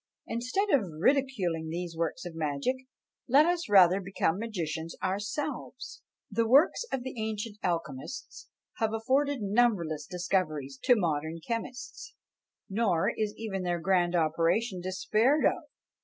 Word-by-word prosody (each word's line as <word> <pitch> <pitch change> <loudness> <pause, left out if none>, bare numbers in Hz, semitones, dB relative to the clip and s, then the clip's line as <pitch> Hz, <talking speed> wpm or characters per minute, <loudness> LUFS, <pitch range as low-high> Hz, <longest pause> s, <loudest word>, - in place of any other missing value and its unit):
Instead 250 - -1
of 280 - +5 0.2
ridiculing 185 - +1
these 170 0 -4
works 165 +1 -2
of 175 - -6
magic, 155 - -1 0.5
let 280 +4 +6
us 345 -6 0
rather 190 -1 +6
become 190 -1 0
magicians 165 -7 -4
ourselves! 205 +9 -4 0.3
The 225 +2 +1
works 280 - +5
of 260 -2 -2
the 260 - -5
ancient 215 0 -4
alchemists 165 - -4 0.3
have 220 -1 0
afforded 265 +3 +1
numberless 195 -9 +1
discoveries 155 -7 -2
to 250 - +6
modern 160 -4 -1
chemists: 245 - -6 0.5
nor 195 -5 +1
is 215 -1 -2
even 205 -4 -3
their 175 -1 -1
grand 175 0 +2
operation 170 +5 +1
despaired 215 - +2
of. 345 - +1
195 Hz, 125 wpm, -29 LUFS, 170-235 Hz, 0.5 s, let